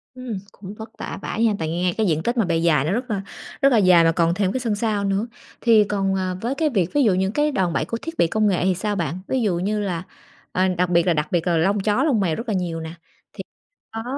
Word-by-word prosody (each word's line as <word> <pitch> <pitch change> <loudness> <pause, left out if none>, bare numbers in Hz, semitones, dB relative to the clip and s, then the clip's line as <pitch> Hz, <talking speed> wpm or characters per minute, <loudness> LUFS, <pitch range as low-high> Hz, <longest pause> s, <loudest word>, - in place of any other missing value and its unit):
Ừm, 255 -5 -5
cũng 200 0 -10
vất 220 +1 -9
vả - - -6
vãi 225 - -2
ha! 220 - +3
Tại 160 -1 -2
nghe 175 +2 0
cái 220 - +1
diện 160 -2 0
tích 240 +1 -1
mà 225 - +3
bề 170 -2 0
dài 155 -4 +2
nó 165 - 0
rất 245 +4 -2
là 200 - -1 0.4
rất 275 - +5
là 240 - +4
dài 185 -4 +6
mà 165 - +4
còn 170 0 +1
thêm 190 0 0
cái 260 - -2
sân 230 -4 -1
sau 210 -1 -1
nữa. 195 +3 0 0.3
Thì 225 -3 +5
còn, 195 -1 -1
ờ, 185 -1 -2
với 250 +4 -2
cái 315 0 +1
việc 190 - 0
ví 290 - +3
dụ 215 -6 +4
những 190 +2 0
cái 295 +4 +1
đòn 185 - 0
bẩy - - 0
của 230 - -4
thiết 330 0 -7
bị 170 - +3
công 215 +4 +1
nghệ 185 -4 +1
thì 190 -1 +2
sao 205 +3 -2
bạn? 170 -2 -2
Ví 260 -2 0
dụ 200 -6 +1
như 210 +4 -1
là 180 -4 -2 0.5
ờ, 185 +1 +2
đặc 180 0 +1
biệt 170 0 +2
là 175 - +4
đặc 150 -1 -1
biệt 175 0 0
là 170 - +2
lông 195 +5 +2
chó, 210 +6 +1
lông 280 -8 +2
mèo 170 -5 +1
rất 230 - -6
là - - 0
nhiều 170 -3 -2
nè, 160 0 -7 0.4
thì - - -7 0.5
có 225 0 -5
195 Hz, 290 wpm, -22 LUFS, 175-225 Hz, 0.5 s, dài